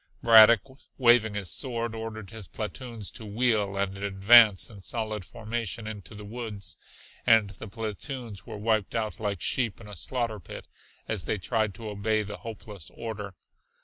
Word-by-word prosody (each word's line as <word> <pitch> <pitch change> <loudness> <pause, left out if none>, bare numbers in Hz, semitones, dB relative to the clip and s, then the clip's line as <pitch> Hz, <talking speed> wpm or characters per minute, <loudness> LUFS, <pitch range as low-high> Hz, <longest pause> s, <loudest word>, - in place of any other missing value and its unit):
Braddock, 115 -1 +9 0.4
waving 120 -4 +5
his 100 -5 -2
sword, 115 -3 -2
ordered 110 -3 -6
his 110 -4 -6
platoons 115 -1 -5
to 115 - -9
wheel 105 -2 +1
and 100 -1 -1
advance 100 +1 +6
in 105 -4 -11
solid 110 0 -2
formation 115 +3 -4
into 105 -2 -8
the 105 0 -9
woods 105 -5 -6 0.5
and 110 -3 +5
the 100 +3 -9
platoons 110 0 -6
were - - -8
wiped 110 -1 0
out 110 -2 -2
like 100 -4 -2
sheep 120 -5 0
in 110 - -12
a 105 - -8
slaughter 115 +2 -2
pit - - -9 0.4
as 100 -6 -1
they 105 - 0
tried 110 0 0
to 115 +1 -7
obey 105 +1 0
the 105 0 -7
hopeless 105 -5 -8
order. 105 -4 -6
110 Hz, 160 wpm, -28 LUFS, 100-115 Hz, 0.5 s, Braddock